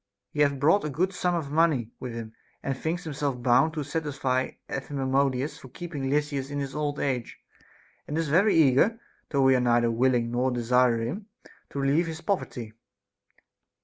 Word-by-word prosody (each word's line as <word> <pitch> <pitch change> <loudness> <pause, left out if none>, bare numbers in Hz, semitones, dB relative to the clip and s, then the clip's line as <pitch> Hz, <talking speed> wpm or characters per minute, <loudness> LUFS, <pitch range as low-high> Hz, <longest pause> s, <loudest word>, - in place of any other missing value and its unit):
He 150 - -6
hath 140 -2 +3
brought 160 +9 +4
a 150 - -2
good 185 +7 0
sum 180 -1 0
of 150 -5 -3
money 150 -8 +2
with 125 - -5
him, 115 -1 -7 0.3
and 135 - -1
thinks 165 +6 -3
himself 140 -5 -3
bound 130 +6 +4
to 150 - -2
satisfy 135 -4 -1
Epaminondas 135 0 -1
for 130 - -12
keeping 145 -2 -5
Lysis 145 -1 -1
in 145 - -4
his 140 -1 -3
old 150 -1 -2
age; 125 -4 -2 0.7
and 150 - -3
is 165 -1 0
very 185 +9 +4
eager, 160 - +4 0.3
though 140 -3 +2
we 135 0 +6
are - - +3
neither 120 -1 +3
willing 120 0 +2
nor 125 +2 +1
desire 125 -1 +2
him, 190 - -4 0.4
to 140 - -5
relieve 145 +5 +2
his 160 0 -6
poverty. 120 - -3
140 Hz, 175 wpm, -27 LUFS, 125-155 Hz, 0.7 s, we